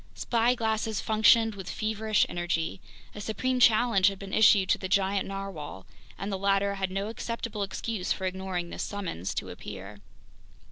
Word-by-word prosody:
Spyglasses 225 -3 +1
functioned 220 +1 +4
with 190 -3 -8
feverish 215 0 +1
energy. 175 0 -2 0.3
A 210 - -7
supreme 250 +5 -1
challenge 220 -4 +5
had 195 -1 0
been 195 0 -9
issued 210 -3 +6
to - - +3
the 185 - -5
giant 195 0 +1
narwhale, 195 - -6 0.3
and 200 +2 -4
the 195 - -2
latter 200 0 +2
had 195 -1 -2
no 195 +2 -2
acceptable 230 -1 -4
excuse 200 0 -3
for 190 - -1
ignoring 185 -2 -3
this - - -5
Summons 180 - -4
to - - -3
Appear! 100 +2 -9
200 Hz, 155 wpm, -28 LUFS, 190-220 Hz, 0.3 s, issued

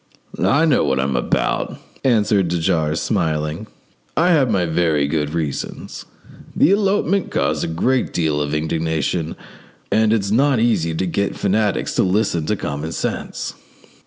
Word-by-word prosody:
"I 145 +4 +4
know 150 -5 +3
what 65 -2 +1
I'm 65 0 0
about," - - -1 0.3
answered 105 -6 +3
de 85 +1 -1
Jars, 80 -1 0
smiling; 75 +6 -1 0.5
"I 175 +3 +4
have 140 -7 +3
my 95 -5 +1
very 80 -3 +1
good 75 +1 -1
reasons. 75 -5 -4 0.5
The 170 - +4
elopement 200 -1 +1
caused - - 0
a - - -1
great 120 +11 0
deal 80 -3 0
of 75 +1 -2
indignation, 80 +1 -1 0.6
and 110 0 +3
it's 100 -3 +1
not 135 +2 +3
easy 85 -9 +1
to 95 - -1
get 100 +3 -1
fanatics 105 +1 0
to - - +4
listen 90 -5 0
to 105 - +1
common 75 -2 -4
sense. - - -4
85 Hz, 150 wpm, -20 LUFS, 80-110 Hz, 0.6 s, I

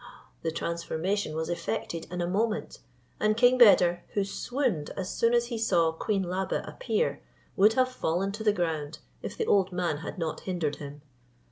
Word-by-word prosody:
The 165 - -1
transformation 170 +2 -2
was 160 0 -2
effected 170 -1 -3
in 180 0 -3
a - - -1
moment, 215 +4 -1 0.4
and 215 0 +2
king 250 +1 +5
Beder, 175 -6 +6
who 200 - +2
swooned 220 - -2
as 185 -1 -3
soon 230 +1 +2
as 240 0 +3
he 230 - -2
saw 170 -7 +3
Queen 195 +4 -1
Labe 185 +1 -2
appear, - - -1 0.3
would 210 +2 +5
have 255 +1 +3
fallen 190 -3 -1
to 215 +2 -6
the 215 - +4
ground, 160 -6 -2 0.2
if - - -6
the - - 0
old 195 -2 +3
man 175 -4 -1
had 165 - -7
not 165 -3 -3
hindered 170 -6 -2
him. 145 0 -9
185 Hz, 175 wpm, -28 LUFS, 165-215 Hz, 0.4 s, Beder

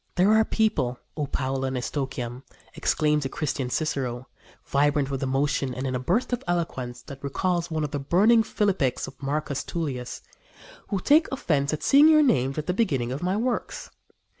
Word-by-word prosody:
"There 190 +4 +4
are 220 0 +5
people, 150 - 0 0.2
O 150 -3 -2
Paula 135 0 -2
and 130 -1 -2
Eustochium," 125 -2 -4 0.3
exclaims 150 -1 +1
the 135 - -3
Christian 135 -3 -2
Cicero, 130 -4 -2 0.4
vibrant 145 0 +1
with 135 - -3
emotion 135 -1 0
and 130 +2 -4
in 130 - -2
a 125 - -1
burst 195 - 0
of 245 - -2
eloquence 130 -9 -2
that 140 +2 -11
recalls 175 +5 -1
one 160 -1 -1
of 150 - -3
the 145 - -2
burning 200 +11 +4
philippics 195 - 0
of - - -12
Marcus 140 0 -2
Tullius, 135 -7 -4 0.6
"who 200 - -1
take 300 - +4
offence 150 - 0
at 155 - -3
seeing 285 +3 +7
your 310 -1 +6
names 135 - +1
at 155 - -2
the 180 - 0
beginning 140 - 0
of 135 - -4
my 185 +3 0
works. 245 +2 -3
145 Hz, 180 wpm, -25 LUFS, 130-185 Hz, 0.6 s, seeing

